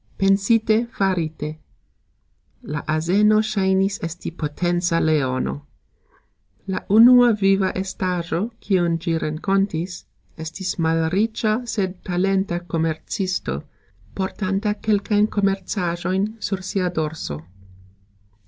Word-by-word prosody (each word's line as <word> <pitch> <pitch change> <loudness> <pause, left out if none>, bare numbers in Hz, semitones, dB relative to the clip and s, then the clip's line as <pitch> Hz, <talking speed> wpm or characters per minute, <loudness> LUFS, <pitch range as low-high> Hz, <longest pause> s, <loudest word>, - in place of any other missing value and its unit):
Pensite, 215 +4 +3
farite. 160 -6 -2 1.1
La 150 0 -4
azeno 185 +8 +3
sxajnis 195 -1 +1
esti 165 +1 -5
potenca 175 +2 -1
leono. 130 - 0 1.0
La 190 - -2
unua 240 +3 +8
viva 195 -2 +2
estajxo, 180 +1 -2
kiun 175 -4 +1
gxi 165 -1 -1
renkontis, 175 +2 -1 0.3
estis 175 +4 -5
malricxa 205 +8 +1
sed 190 -5 -2
talenta 190 0 0
komercisto, 165 - -2 0.5
portanta 195 +2 -1
kelkajn 210 0 +1
komercajxojn 195 -2 -1
sur 195 -3 -3
sia 185 -2 0
dorso. 155 - -3
185 Hz, 85 wpm, -22 LUFS, 165-200 Hz, 1.1 s, unua